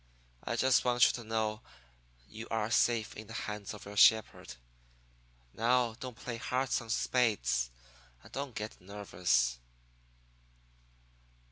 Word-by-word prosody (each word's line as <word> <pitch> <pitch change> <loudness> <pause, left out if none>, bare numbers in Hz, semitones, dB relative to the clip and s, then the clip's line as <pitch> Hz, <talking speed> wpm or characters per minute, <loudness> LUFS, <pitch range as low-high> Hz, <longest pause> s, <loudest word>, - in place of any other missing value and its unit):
I - - -2
just 130 -1 +3
want 120 -1 +5
you - - +4
to 120 - -6
know 110 -1 -2 0.7
you 110 +2 -9
are 110 0 -1
safe 115 -2 +2
in 110 0 -9
the 115 - -9
hands 105 -2 -5
of 105 - -12
your 100 +1 -9
shepherd. 110 +1 +4 1.0
Now, 120 0 +2
don't 125 -3 -7
play 120 -1 -5
hearts 130 +2 -1
on 115 - -12
spades, 100 - +1 0.5
and - - -16
don't 140 -3 -5
get 105 -2 -6
nervous.' 90 -11 0
110 Hz, 130 wpm, -32 LUFS, 105-120 Hz, 1.0 s, want